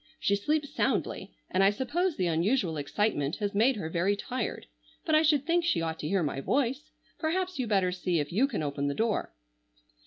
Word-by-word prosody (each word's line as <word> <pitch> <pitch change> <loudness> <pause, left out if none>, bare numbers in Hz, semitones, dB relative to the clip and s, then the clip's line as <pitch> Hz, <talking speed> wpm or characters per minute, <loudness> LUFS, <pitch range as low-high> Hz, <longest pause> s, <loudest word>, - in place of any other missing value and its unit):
She 200 - +2
sleeps 285 +7 -1
soundly, - - -1 0.2
and 190 +1 +3
I 195 - +6
suppose 305 - -1
the 185 - +1
unusual 175 +2 +1
excitement 145 0 -1
has 205 -2 -2
made 235 +6 +3
her 195 -7 -4
very 175 +5 +1
tired. 240 +3 -4 0.4
But 315 - 0
I 310 - +6
should 295 -3 +3
think 340 +1 +2
she 340 - +1
ought 160 -1 -3
to 150 - -3
hear 190 +1 +1
my 140 -2 -2
voice. 270 - 0 0.3
Perhaps 360 +1 -1
you 250 - -1
better 195 -4 +2
see 180 -2 -1
if 145 -1 -3
you 235 +10 +3
can 220 - -3
open 145 -1 -2
the 140 - -1
door." 225 -1 0
205 Hz, 205 wpm, -29 LUFS, 170-280 Hz, 0.4 s, I